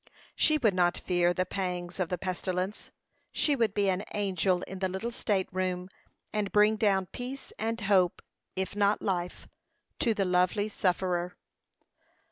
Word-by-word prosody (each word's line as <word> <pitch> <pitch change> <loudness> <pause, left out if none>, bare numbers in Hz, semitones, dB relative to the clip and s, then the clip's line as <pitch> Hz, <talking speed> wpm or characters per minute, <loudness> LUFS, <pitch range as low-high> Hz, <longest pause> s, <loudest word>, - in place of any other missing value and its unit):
She 310 -1 +4
would 225 -8 +3
not 175 -1 +2
fear 175 -1 +2
the 185 +1 0
pangs 180 -1 -4
of 180 -3 0
the 180 - -1
pestilence; 185 +1 -3 0.4
she 295 - +2
would 230 -5 +1
be 205 -1 +2
an 190 +1 +1
angel 185 -3 +1
in 190 - -7
the 190 -1 0
little 190 +6 -3
state 205 -6 0
room, 185 0 -2 0.4
and 210 -2 -1
bring 210 +1 +5
down 200 -3 +2
peace 250 +7 -7
and 225 +1 -1
hope, 190 -3 +2 0.3
if 190 +1 -3
not 205 0 +2
life, 180 -3 -2 0.5
to 235 -7 +2
the 195 - +1
lovely 180 +3 +2
sufferer. 180 -2 0
190 Hz, 155 wpm, -29 LUFS, 180-210 Hz, 0.5 s, bring